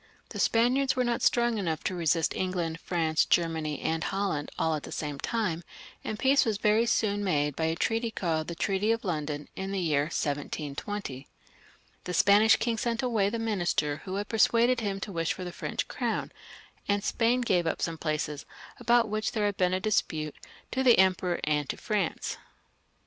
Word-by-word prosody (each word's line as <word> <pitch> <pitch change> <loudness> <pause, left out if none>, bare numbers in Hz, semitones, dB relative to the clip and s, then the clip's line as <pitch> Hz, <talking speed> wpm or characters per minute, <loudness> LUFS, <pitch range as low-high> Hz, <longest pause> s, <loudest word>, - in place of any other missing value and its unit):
The - - -7
Spaniards 255 +4 +3
were 255 - +2
not 240 -1 0
strong 240 -2 +2
enough 165 -5 -2
to - - -1
resist 165 -2 +1
England, 175 -3 -2
France, 160 -3 +1
Germany, 160 -3 0
and 160 0 -1
Holland, 195 -7 -1
all 160 - +1
at 155 - -2
the - - -9
same 145 -2 -4
time, 185 - -1 0.4
and 215 - -4
peace 270 +4 +4
was 220 -3 0
very 215 +3 +3
soon 205 -3 +1
made 150 -6 +1
by 160 - -1
a 160 0 0
treaty 225 +6 0
called 165 -7 -2
the 170 - -5
Treaty 195 +5 +1
of 230 -1 -1
London, 150 -4 -3
in 190 +1 -4
the 200 - -2
year 150 -5 +1
1720. 145 0 -4 0.8
The 180 - -3
Spanish 205 +5 +6
king 230 -1 -1
sent 235 +2 -1
away 220 -6 +2
the 230 - -3
minister 175 -9 0
who 190 0 -4
had 205 +1 -2
persuaded 235 +2 +3
him 200 -3 -2
to 200 - -5
wish 165 -2 -1
for 185 - -7
the 180 - -5
French - - -3
crown, - - -2 0.6
and 200 0 +1
Spain 240 +3 +2
gave 180 -8 +1
up - - -1
some 165 -1 -2
places 150 -2 -3 0.3
about 235 -1 +3
which 215 0 -2
there 215 -3 0
had 205 -1 0
been 180 0 +2
a - - 0
disptttejxtq^ 160 -7 0 0.4
the 260 -2 +4
Emperor 185 -2 +3
and 150 -2 0
to - - -3
France. 205 -6 -2
190 Hz, 185 wpm, -28 LUFS, 160-225 Hz, 0.8 s, Spanish